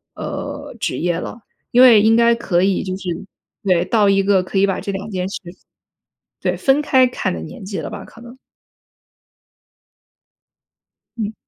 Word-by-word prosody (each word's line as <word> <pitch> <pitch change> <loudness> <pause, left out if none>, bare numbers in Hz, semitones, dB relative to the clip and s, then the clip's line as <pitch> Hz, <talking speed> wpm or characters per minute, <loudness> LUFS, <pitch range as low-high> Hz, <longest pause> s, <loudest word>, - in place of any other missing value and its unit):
呃， - - -6
职 - - -2
业 175 0 0
了。 230 - -7 0.3
因 250 +1 +6
为 235 -5 +8
应 220 +2 +4
该 235 0 +5
可 185 -6 0
以 195 -1 +1
就 185 -1 -4
是 185 -2 -6 0.5
对， 180 -3 +2
到 210 -1 +3
一 195 0 +3
个 195 -1 +3
可 185 +2 -5
以 195 - +5
把 195 -1 -1
这 200 - -4
2 200 +2 -6
件 185 0 -2
事 - - -5
分 175 -1 -10 0.9
对， - - -1
分 270 +2 +2
开 260 -3 +4
看 245 - -2
的 80 - -5
年 80 - -10
纪 195 0 -5
了 160 - -5
吧， - - -8
可 230 - -15
能。 240 +2 -13 2.8
嗯。 220 -1 -3
200 Hz, 185 characters per minute, -19 LUFS, 185-235 Hz, 2.8 s, 为